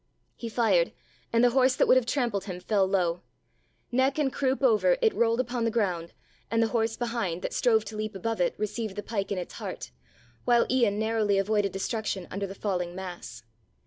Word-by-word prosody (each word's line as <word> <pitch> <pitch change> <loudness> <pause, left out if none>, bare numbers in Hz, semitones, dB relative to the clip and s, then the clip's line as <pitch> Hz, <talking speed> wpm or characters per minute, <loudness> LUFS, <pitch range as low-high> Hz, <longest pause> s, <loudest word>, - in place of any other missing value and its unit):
He 230 - -6
fired, 205 -7 +2 0.4
and 230 +1 +3
the 245 - +5
horse 260 0 +4
that - - +3
would - - +6
have 255 -2 +2
trampled 240 -8 0
him 180 -3 -5
fell 195 +1 +1
low. 180 -3 0 0.7
Neck 260 +3 +2
and 280 -4 +1
croup 270 0 0
over 260 - +4
it 455 -3 +3
rolled 230 0 +2
upon 245 -1 -1
the 230 - +2
ground 185 -7 -1 0.4
and 230 - +1
the 225 -1 +3
horse 225 -1 0
behind, 230 -8 -2
that - - -3
strove 220 -3 +3
to 215 - -7
leap 215 0 -4
above 225 +1 -2
it, 175 - +1
received 215 -1 -3
the 205 - -4
pike 200 -3 -3
in 200 - -1
its 180 - -5
heart, - - -6 0.5
while 240 -1 +4
Ian 235 -6 +2
narrowly 220 -2 +1
avoided 200 0 +1
destruction 195 -1 -3
under 200 +1 -3
the 195 - -8
falling 180 -4 -2
mass. 175 - -8
220 Hz, 200 wpm, -27 LUFS, 195-235 Hz, 0.7 s, would